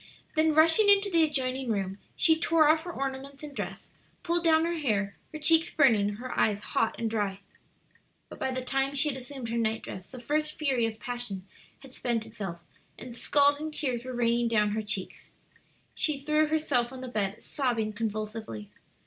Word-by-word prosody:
Then 315 -1 +3
rushing 325 +7 +5
into 400 0 +5
the 335 -2 +4
adjoining 265 -4 -1
room, 195 -1 -2 0.2
she 320 - +5
tore 320 -1 +3
off 315 +2 +3
her 350 - -4
ornaments 275 0 -5
and 290 -2 -8
dress, - - -6 0.3
pulled 345 0 +1
down 320 -1 +4
her 340 -1 -2
hair, 205 -8 0 0.2
her 310 - -6
cheeks 325 +2 +4
burning, 215 -8 +3
her 255 +4 -6
eyes 205 -2 +2
hot 225 - 0
and 230 - -1
dry. 205 -3 -2 0.9
But - - -12
by - - -1
the 255 0 -3
time 270 +2 0
she 295 +2 +5
had 265 - -3
assumed 255 -2 -6
her 235 +1 -1
night 220 0 -1
dress 185 -1 -8
the 255 - -9
first 305 +5 -1
fury 265 -7 +1
of 220 -1 -7
passion 240 -6 -4 0.4
had 270 -2 -12
spent 235 -4 -2
itself, 195 -7 -6 0.4
and 250 - -9
scalding 285 +4 +2
tears 255 -6 -2
were 255 0 -6
raining 235 0 +2
down 210 -2 +2
her 220 +1 -1
cheeks. 205 -3 -5 0.6
She 300 -3 0
threw 305 +2 +2
herself 285 -6 0
on 260 -1 -8
the 260 - -6
bed, 210 -4 -3
sobbing 230 -6 -1
convulsively. 215 - -5
255 Hz, 185 wpm, -28 LUFS, 220-305 Hz, 0.9 s, rushing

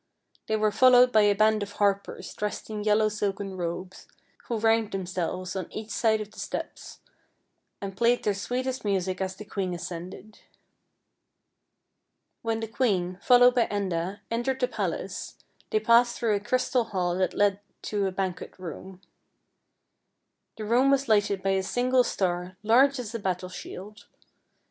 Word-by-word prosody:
They 220 - +1
were 215 0 +2
fol 255 +4 +5
lowed 250 0 +7
by 220 - +5
a 205 -1 +4
band 215 +1 +3
of 205 0 -5
harpers 200 -1 -1
dressed 210 +1 -4
in 210 -1 -4
yellow 215 +1 +3
silken 200 -2 -3
robes, 180 +1 -5 0.4
who 235 - -2
ranged 225 -1 +2
themselves 185 0 -3
on 185 -3 -4
each 215 0 -7
side 220 +1 +2
of 210 0 -7
the - - -13
steps - - -6 0.8
and 195 -1 -6
played 235 +3 +2
their 210 - +1
sweetest 255 +6 -3
music 190 -2 -1
as 190 0 -2
the 210 - -10
queen 190 -3 -3
ascended. 180 +5 -8 2.0
When 225 -1 -2
the 225 - -3
queen, 195 -6 0
followed 245 +1 +6
by 245 -2 +2
Enda, 190 -1 -2
entered 250 +3 -1
the 250 - +2
palace, - - -4 0.3
they 435 - +2
passed 240 - +4
through 225 -3 +1
a 205 - +1
crystal 250 +2 0
hall 180 -4 -1
that 185 - 0
led 200 -1 +2 0.2
to 205 -2 -1
a - - -2
banquet 185 -1 -4
room. 185 +1 -9 1.6
The 215 - -5
room 245 +5 +3
was 275 0 +2
lighted 205 -3 +2
by 195 - +2
a 190 0 +2
single 250 +5 +2
star, 180 -3 -2
large 265 +6 +5
as 240 -3 -6
a 230 - -3
battle 185 -2 -2
shield. 185 +3 -9
205 Hz, 160 wpm, -27 LUFS, 190-230 Hz, 2.0 s, lowed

